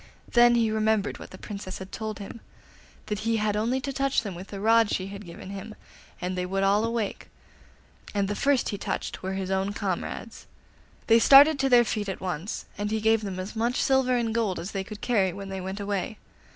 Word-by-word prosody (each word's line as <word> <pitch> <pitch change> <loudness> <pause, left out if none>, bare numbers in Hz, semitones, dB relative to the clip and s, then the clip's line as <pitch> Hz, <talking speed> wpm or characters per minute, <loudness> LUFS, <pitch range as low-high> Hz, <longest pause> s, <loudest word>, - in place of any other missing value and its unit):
Then 240 0 +6
he 225 -2 +2
remembered 220 -1 +1
what - - -10
the 185 - -11
Princess 200 -2 -7
had 190 0 -9
told 215 -1 -4
him 210 +3 -9 0.6
that 210 -1 -3
he 225 +1 0
had 210 -1 0
only 235 +5 +1
to 275 +1 -4
touch 275 -2 +1
them 200 -4 -5
with 180 +3 -9
the 200 - -7
rod 225 +1 +4
she 185 - -1
had 200 -1 -9
given 170 +3 -9
him 200 +2 -7 0.4
and 180 +1 -3
they 180 - -1
would 195 +1 -1
all 200 +2 +3
awake; 230 -3 -3 0.8
and 200 -1 0
the 205 - -1
first 275 +2 +2
he 205 - -4
touched - - -4
were 190 +1 -3
his 190 0 -3
own 190 +1 0
comrades. 205 +3 -4 0.6
They 230 0 +6
started 280 +4 +8
to 270 0 +2
their 240 -1 +6
feet 210 -2 -2
at 190 - -4
once, 185 +1 -4
and 205 0 -1
he 220 +1 0
gave 220 0 +3
them 195 -3 -5
as 185 +4 -6
much 235 +2 0
silver 265 -2 +3
and 230 -2 -1
gold 220 -6 0
as 175 +5 -5
they 195 -1 -2
could 210 +1 -9
carry 195 -7 +2
when 195 +1 -7
they 190 -1 -4
went 190 +2 -5
away. 200 +1 -3
210 Hz, 220 wpm, -27 LUFS, 195-230 Hz, 0.8 s, started